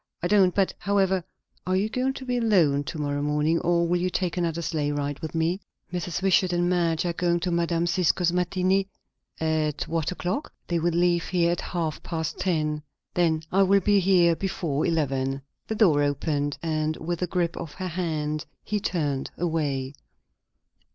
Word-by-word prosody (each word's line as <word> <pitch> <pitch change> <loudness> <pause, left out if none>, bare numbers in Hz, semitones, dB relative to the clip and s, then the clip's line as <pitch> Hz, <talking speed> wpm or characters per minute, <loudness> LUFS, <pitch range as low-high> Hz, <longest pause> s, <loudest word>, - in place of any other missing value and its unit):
"I - - +2
don't; 190 -2 +4
but, 195 -2 +2
however 190 -2 +1 0.4
Are 185 - +2
you 195 +3 +2
going 255 +4 -1
to 265 - -8
be 250 -1 -1
alone 175 -12 +3
to 160 - -5
morrow 145 -1 -1
morning, 150 +3 +1
or 170 0 +2
will 175 +1 +1
you 185 - +1
take 180 -1 -1
another 170 -2 -1
sleigh 150 -3 -1
ride 145 -1 -2
with 160 0 -6
me?" 165 +4 0 0.3
"Mrs. 180 0 -3
Wishart 185 -1 +3
and 175 0 +2
Madge 170 -2 +1
are 175 - 0
going 175 0 +1
to 180 +1 -1
Mme. 170 0 +1
Cisco's 175 0 +2
matinée." 185 +2 +1 0.5
"At 155 -2 0
what 165 0 -1
o'clock?" 180 +10 -3 0.2
"They 170 -1 +1
will 170 +2 +1
leave 175 -1 +2
here 170 -2 +2
at 175 - -1
half 165 -4 -3
past 165 -1 -4
ten." 155 -4 0 0.3
"Then 160 -3 +2
I 195 - +4
will 195 +1 +4
be 205 +1 +4
here 180 -3 +4
before 165 -6 -1
eleven." 135 -4 0 0.2
The 220 - -2
door 175 -10 +4
opened, 145 0 0
and 155 -1 -1
with 170 +2 -4
a 180 - +1
grip 175 -1 -1
of 165 -3 -7
her 185 -1 -4
hand 155 -3 -2 0.2
he 210 - -1
turned 150 -9 -1
away. 145 -6 -1
170 Hz, 180 wpm, -26 LUFS, 155-180 Hz, 0.5 s, don't